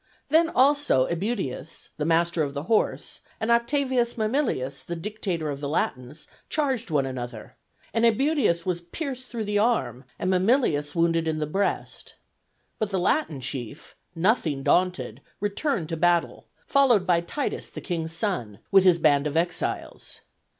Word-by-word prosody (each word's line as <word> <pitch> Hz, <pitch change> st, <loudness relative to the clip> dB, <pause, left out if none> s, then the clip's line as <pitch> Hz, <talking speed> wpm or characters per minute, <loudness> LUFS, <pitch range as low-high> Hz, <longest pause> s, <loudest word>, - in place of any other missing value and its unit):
Then 325 Hz, +3 st, +4 dB
also 280 Hz, -, +3 dB
Æbutius, 170 Hz, -, -3 dB
the 150 Hz, -, -2 dB
master 170 Hz, +1 st, +2 dB
of 145 Hz, -1 st, -2 dB
the 140 Hz, -, -3 dB
horse, 215 Hz, +6 st, 0 dB, 0.2 s
and 220 Hz, +2 st, 0 dB
Oct. 235 Hz, 0 st, +3 dB, 0.5 s
Mamilius, 215 Hz, -, -1 dB
the 170 Hz, -, -5 dB
dictator 170 Hz, -4 st, -3 dB
of 140 Hz, -, -5 dB
the 140 Hz, -, -3 dB
Latins, 145 Hz, 0 st, -2 dB, 0.2 s
charged 265 Hz, -, -1 dB
one 145 Hz, -4 st, +1 dB
another, 120 Hz, -4 st, -6 dB, 0.4 s
and 230 Hz, -, +1 dB
Æbutius 230 Hz, -, +2 dB
was 180 Hz, -2 st, -1 dB
pierced 255 Hz, -, -6 dB
through 235 Hz, -3 st, -4 dB
the 205 Hz, 0 st, 0 dB
arm, 135 Hz, -, 0 dB
and 185 Hz, -, -1 dB
Mamilius 180 Hz, -, +2 dB
wounded 165 Hz, -1 st, +2 dB
in 160 Hz, -1 st, 0 dB
the 155 Hz, -, -1 dB
breast. 195 Hz, +7 st, -3 dB, 0.6 s
But 215 Hz, -, 0 dB
the 195 Hz, -, -1 dB
Latin 175 Hz, -, 0 dB
chief, 125 Hz, +1 st, -6 dB, 0.2 s
nothing 165 Hz, -, +1 dB
daunted, 145 Hz, -10 st, +1 dB, 0.2 s
returned 205 Hz, -, -1 dB
to 165 Hz, -, -3 dB
battle, 175 Hz, +1 st, +1 dB, 0.2 s
followed 255 Hz, -9 st, +4 dB
by 175 Hz, -2 st, +3 dB
Titus, 275 Hz, +12 st, -3 dB
the -, -, -8 dB
king's 165 Hz, -3 st, -3 dB
son, 165 Hz, -, -1 dB
with 195 Hz, -1 st, +6 dB
his 180 Hz, -2 st, +5 dB
band 150 Hz, -3 st, +3 dB
of 150 Hz, +2 st, -2 dB
exiles. 175 Hz, +1 st, -3 dB
175 Hz, 150 wpm, -25 LUFS, 150-225 Hz, 0.6 s, with